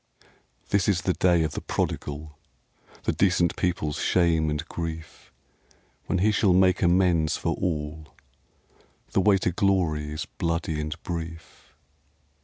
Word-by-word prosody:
This 100 -1 +2
is 90 -4 +1
the 90 - +1
day 85 -3 +3
of 80 - -1
the - - -5
prodigal, 75 +1 -3 0.7
The - - +1
decent 90 -3 +2
people's 85 -5 -1
shame 85 -3 +2
and 75 +2 -3
grief, 80 -1 -7 0.8
When - - 0
he 105 +4 +3
shall 100 -3 +3
make 95 0 +4
amends 85 -3 +3
for - - -1
all. 75 -2 -3 1.0
The 95 - +2
way 100 0 +4
to 90 - 0
Glory's 80 -5 0
bloody 85 -2 -2
and 75 0 -4
brief. 85 -1 -7
85 Hz, 130 wpm, -26 LUFS, 80-90 Hz, 1.0 s, make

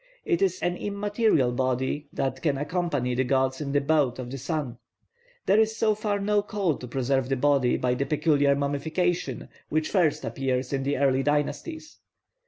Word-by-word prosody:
It 360 -5 +1
is 185 -2 +1
an 175 0 0
immaterial 205 - +1
body 130 +3 -1
that 135 -1 -2
can 145 -4 +1
accompany 145 -4 -1
the 130 +2 +1
gods 130 +1 0
in 140 -2 -3
the 145 0 +2
boat 145 -4 +2
of 125 -1 -6
the 135 - -5
sun. 140 -4 -3 0.7
There 205 - +4
is 220 0 +2
so 215 -1 +3
far 210 -1 -1
no 205 +1 +2
call 200 -6 -1
to 125 - -8
conserve 130 +1 0
the 135 - +2
body 135 -1 +2
by 125 -1 +1
the 140 +2 -2
peculiar 145 -2 +3
mummification 160 +5 -1 0.2
which 155 0 0
first 170 -8 +2
appears 130 +2 -2
in 135 - 0
the 140 +2 -1
early 135 -1 +2
dynasties. 150 - -2
145 Hz, 180 wpm, -26 LUFS, 130-180 Hz, 0.7 s, There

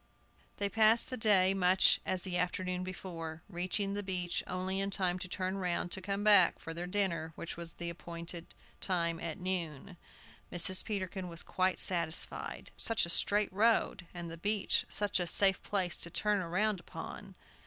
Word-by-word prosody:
They 200 - +1
passed 220 +3 +3
the - - -2
day 200 -5 +4
much 185 0 +4
as 185 -1 -1
the 185 -2 -4
afternoon 180 +1 -2
before, 165 -3 -7
reaching 190 +2 -2
the 205 - -2
beach 180 -3 -2
only 185 +1 -2
in 195 0 -1
time 185 -2 -1
to 185 - -6
turn 185 +2 -3
round 175 -1 -2
to 190 - 0
come 200 +2 -3
back 205 -4 +6
for 165 - -7
their 175 +2 -5
dinner, 180 -4 -1
which 170 - -6
was 170 0 -8
appointed 170 0 -6 0.4
at 170 -2 -1
noon. 175 -2 -3 0.5
Mrs. 180 +2 +5
Peterkin 190 -3 -4
was 170 -1 -4
quite 185 0 0
satisfied. 170 -2 0
"Such 225 -5 +2
a 170 - 0
straight 205 +2 +2
road, 205 -4 +1
and 175 -2 -7
the 165 - -7
beach 205 +3 +1
such 205 -2 0
a 175 - -2
safe 195 +2 +5
place 185 -4 0
to 170 - -4
turn 205 +2 0
round 195 +4 0
upon!" - - -9
185 Hz, 165 wpm, -32 LUFS, 170-195 Hz, 0.5 s, back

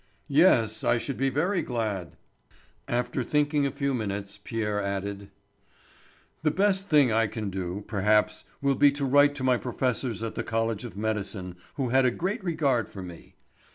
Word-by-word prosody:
"Yes, 115 - +4
I 120 - +3
should 135 +2 -4
be 135 +1 +1
very 170 +8 0
glad." 110 - -3 0.7
After 120 +1 -1
thinking 145 +1 +1
a - - -3
few 140 -1 -1
minutes 100 -3 -4
Pierre 105 -3 -2
added: 100 0 -4 1.1
"The 155 - +2
best 195 +3 +1
thing 145 -6 +5
I 115 0 +3
can 105 -1 -4
do, 95 +1 -4
perhaps, 105 0 +1 0.2
will 140 0 +3
be 145 +1 +5
to 140 -1 -2
write 145 +2 +5
to 135 - -4
my 130 -1 +3
professors 125 -1 -2
at 115 - -3
the - - -3
college 115 -1 -1
of 110 - -9
Medicine, 100 -4 -3 0.2
who 130 -3 -1
had 130 +2 +4
a - - +5
great 185 - -3
regard 140 - +1
for 95 - -8
me. 85 -2 -11
120 Hz, 170 wpm, -27 LUFS, 105-140 Hz, 1.1 s, thing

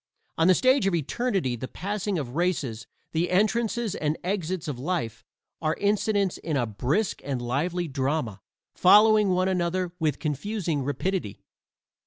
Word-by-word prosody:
On 165 - +3
the 185 - +6
stage 255 -3 +3
of 190 - +2
Eternity 170 - -1
the 130 +2 -6
passing 200 +3 -3
of 135 -4 -5
races 150 -11 -1 0.2
the 165 +2 0
entrances 215 +3 +1
and 150 0 -1
exits 185 -2 -2
of 140 -5 -4
Life 130 -7 -3 0.4
are 155 0 0
incidents 205 -1 +1
in 155 -3 -2
a 120 - +1
brisk 130 - -1
and 135 -2 -2
lively 165 +9 -1
drama, 130 -7 -2 0.3
following 210 +2 +6
one 185 0 +2
another 180 -1 -1
with 155 -4 0
confusing 165 +1 -2
rapidity. 145 - -3
175 Hz, 145 wpm, -26 LUFS, 140-195 Hz, 0.4 s, the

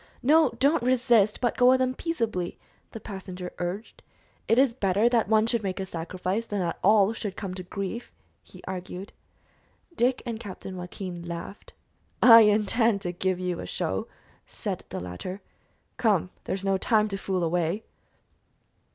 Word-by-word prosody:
"No, 310 +5 +5
don't 280 +4 +3
resist, 240 -4 +3
but 240 -2 +1
go 250 0 +5
with 260 0 +5
'em 255 0 +1
peaceably," 230 - -2 0.3
the 225 - -8
passenger 185 -3 -7
urged. 180 +5 -5 0.5
"It 225 - +3
is 265 -2 +4
better 205 -1 +2
that 235 -4 +2
one 220 0 +4
should 230 0 0
make 195 -1 -3
a 190 - -2
sacrifice 185 +5 -3
than 205 - -3
that 175 -3 -2
all 210 +1 +5
should 205 -3 -5
come 195 -3 -5
to 185 - -6
grief," 200 +5 -5 0.3
he - - -16
argued. 185 +1 -6 0.8
Dick 250 -1 +1
and 230 -2 -4
Captain 190 -2 -8
Joaquin 180 0 -6
laughed. 170 +3 -8 0.5
"I 230 -2 +10
intend 215 0 +3
to 175 -3 -2
give 185 +1 -1
you 180 -1 -2
a - - -6
show," - - -2 0.4
said - - -5
the - - -4
latter. 90 - -6 0.6
"Come, 200 -6 +2
there - - -1
is 195 0 -6
no 195 0 +2
time 215 +1 +2
to 195 - -2
fool 185 -2 -1
away!" 170 +4 0
200 Hz, 165 wpm, -27 LUFS, 185-230 Hz, 0.8 s, I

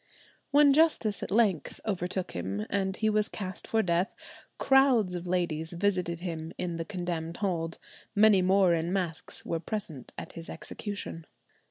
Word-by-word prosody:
When 285 -1 +6
justice 285 -9 +3
at - - -4
length 200 -7 +1
overtook 185 -2 -2
him, 95 +4 -3
and 190 -1 0
he 220 - +1
was 215 0 +2
cast 190 -3 -6
for 225 0 +2
death, 175 +3 0 0.4
crowds 265 -8 +4
of 175 0 -5
ladies 170 -2 -1
visited 175 -2 0
him 165 -2 -5
in 175 -2 -3
the 165 - -3
condemned 175 -2 -4
hold; 170 -5 -2 0.4
many 210 -2 +6
more 185 -1 +4
in 165 +1 0
masks 180 -4 -3
were 165 - -1
present 165 - -5
at - - -6
his 165 0 -9
execution. 200 -6 -6
180 Hz, 155 wpm, -29 LUFS, 165-205 Hz, 0.4 s, When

